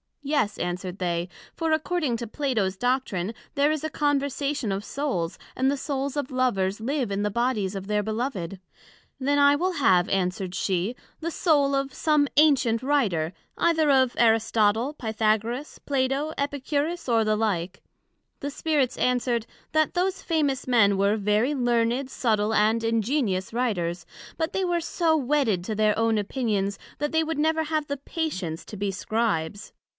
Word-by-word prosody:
Yes, 280 -8 0
answered 180 +1 -3
they, 175 -1 -1 0.3
for 325 -1 -1
according 315 -4 0
to 235 0 -5
Plato's 220 -7 -1
Doctrine, 240 -5 -1 0.2
there 285 +1 +3
is 310 -1 -2
a 315 - -1
Conversation 285 -4 0
of 195 +1 -2
Souls, 250 - -2 0.2
and 260 +1 +2
the 280 - 0
Souls 275 0 -3
of 285 -3 -3
Lovers 205 -7 0
live 255 -1 -1
in 200 +1 -1
the 210 - +1
Bodies 215 -4 0
of 195 -1 -5
their 210 0 +1
Beloved. 215 -4 -3 0.6
Then 285 +2 +1
I 285 0 +6
will 365 +5 0
have, 185 - +3
answered 185 -1 -1
she, 190 +5 -1 0.2
the 335 +1 -3
Soul 285 -5 +2
of 275 -1 -1
some 300 -1 +2
ancient 270 -7 +4
famous 260 - -7
Writer, 190 - +1 0.2
either 320 -3 +3
of 260 -2 +3
Aristotle, 225 +2 +3
Pythagoras, 225 +2 -1
Plato, 275 +2 0
Epicurus, 285 +3 -2
or 230 -1 +4
the 215 0 +2
like. 195 -5 -1 0.6
The 285 - -4
Spirits 285 -4 0 0.3
said, 235 -3 0 0.3
That 310 +1 +1
those 370 +2 0
famous 295 -6 0
Men 205 -6 +4
were 200 +2 +2
very 210 +6 +1
learned, 245 0 +1
subtile, 220 -4 0
and 220 +2 +3
ingenious 225 -3 0
Writers; 180 -9 -1 0.3
but 320 0 -2
they 385 -1 0
were 350 -1 0
so 325 -1 +1
wedded 260 - +1
to 215 - -3
their 215 0 +2
own 225 -1 +2
opinions, 205 -2 -1 0.2
that 295 0 -1
they 320 0 +2
would 320 -1 -3
never 320 +1 +2
have 310 -1 -1
the 285 - -3
patience 260 - -4
to 210 - -9
be 200 0 -1
Scribes. 205 -3 -2
245 Hz, 160 wpm, -26 LUFS, 205-290 Hz, 0.6 s, I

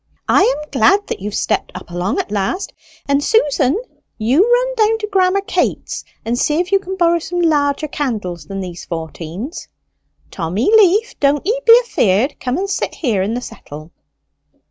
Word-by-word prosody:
"I - - +4
am 385 -9 0
glad 405 +1 +3
that - - -3
you've 205 +2 -5
stepped - - -1
up 180 -1 -9
along 175 +3 -2
at - - -3
last; 210 - -2 0.3
and, 280 0 +2
Susan, 295 - +2 0.4
you 240 +9 +3
run - - +2
down 445 -1 +3
to 430 -1 -4
Grammer 385 -1 +2
Kaytes's 395 - -2 0.2
and 235 +2 -1
see 300 +1 +1
if 360 +2 -2
you 395 - +4
can 380 0 -6
borrow 340 -1 +3
some 350 +2 -4
larger 300 -3 +1
candles 215 - -4
than 195 -1 -5
these 180 -2 -7
fourteens. 170 - -6 0.6
Tommy 190 - -1
Leaf, 425 +2 +3
don't 280 0 +2
ye 470 +5 0
be 460 +1 +9
afeard! 220 - +1
Come 250 +2 -2
and 390 +2 -2
sit 395 - -2
here 225 - 0
in 210 +5 -1
the 245 - -3
settle." 155 -7 -10
290 Hz, 175 wpm, -17 LUFS, -, 0.6 s, be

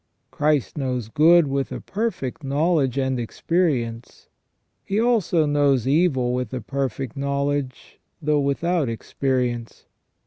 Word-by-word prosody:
Christ 150 -1 0
knows 125 -5 -2
good 165 +6 +5
with 135 -1 -2
a - - -4
perfect 200 - -3
knowledge 140 -1 +1
and 130 -2 0
experience. 120 -3 -2 0.5
He 200 +2 -1
also 220 -9 +2
knows 145 -4 +2
evil 135 -5 +2
with 125 -3 -2
a 125 - -4
perfect 135 0 -3
knowledge, 140 -1 -3 0.2
though 150 -2 +1
without 145 +1 0
experience. 120 0 -2
140 Hz, 115 wpm, -23 LUFS, 125-155 Hz, 0.5 s, good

